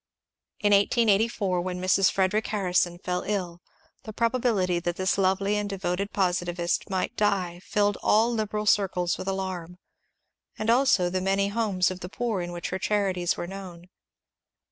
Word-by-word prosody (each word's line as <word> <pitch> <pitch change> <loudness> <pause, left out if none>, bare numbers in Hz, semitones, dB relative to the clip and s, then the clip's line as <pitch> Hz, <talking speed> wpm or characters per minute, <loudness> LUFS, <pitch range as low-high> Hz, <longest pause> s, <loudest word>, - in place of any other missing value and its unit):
In 205 -1 +2
1884, 205 -2 +2
when 180 0 -4
Mrs. 185 +1 +3
Frederic 195 +3 +1
Harrison 180 -4 0
fell 180 0 -3
iU, 180 -4 -3 0.4
the 220 - -8
probability 225 -6 +1
that 175 0 -2
this 185 0 0
lovely 195 +1 +1
and 205 -1 -2
devoted 195 0 -2
positivist 175 -1 -1
might 190 -1 -2
die 190 -4 0
filled 205 -1 0
all 225 +3 +3
liberal 215 -1 -2
circles 185 -4 +1
with - - -6
alarm, 185 -3 -4 0.8
and 215 +1 +1
also 230 -8 +3
the 185 0 -1
many 195 +1 +1
homes 200 -4 +1
of 185 - -6
the 180 - -7
poor 225 -2 -2
in 175 0 -5
which 175 -1 -5
her 185 - -3
charities 190 -4 0
were - - -3
known. 180 -2 -9
190 Hz, 155 wpm, -26 LUFS, 180-210 Hz, 0.8 s, Mrs